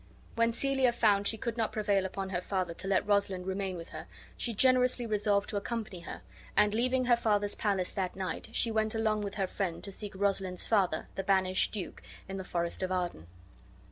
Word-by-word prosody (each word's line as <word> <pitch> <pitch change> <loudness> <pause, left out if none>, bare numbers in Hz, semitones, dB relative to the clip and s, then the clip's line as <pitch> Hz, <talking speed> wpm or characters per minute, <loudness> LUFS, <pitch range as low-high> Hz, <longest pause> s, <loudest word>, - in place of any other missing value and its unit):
When 230 0 +2
Celia 265 +1 +2
found 205 -4 +3
she 220 - +1
could 235 +2 -3
not 225 -2 0
prevail 200 -3 +1
upon 190 0 -5
her 180 -1 -1
father 185 -2 -2
to 190 - -6
let 195 +1 +2
Rosalind 200 -3 +1
remain 190 -1 -2
with 165 - -8
her, - - -8 0.3
she 240 - -3
generously 250 +1 +3
resolved 205 -2 +1
to 205 - -1
accompany 215 -3 -4
her; 170 - -8 0.3
and, 210 0 +5
leaving 255 +3 +2
her 240 -1 +5
father's 205 -3 +2
palace 195 -4 0
that 185 -3 -2
night, 185 +1 -4
she 230 0 +2
went 220 0 +1
along 215 -1 +1
with 200 -1 -4
her 195 -1 0
friend 185 -3 -3
to 200 - -3
seek 205 0 -6
Rosalind's 190 -2 0
father, 190 -7 +1
the 195 - -3
banished 185 -1 +3
duke, 200 -5 -6 0.3
in 195 0 -5
the 190 - -4
forest 170 -2 -3
of 185 0 -1
Arden. 175 - -2
200 Hz, 205 wpm, -31 LUFS, 190-220 Hz, 0.3 s, and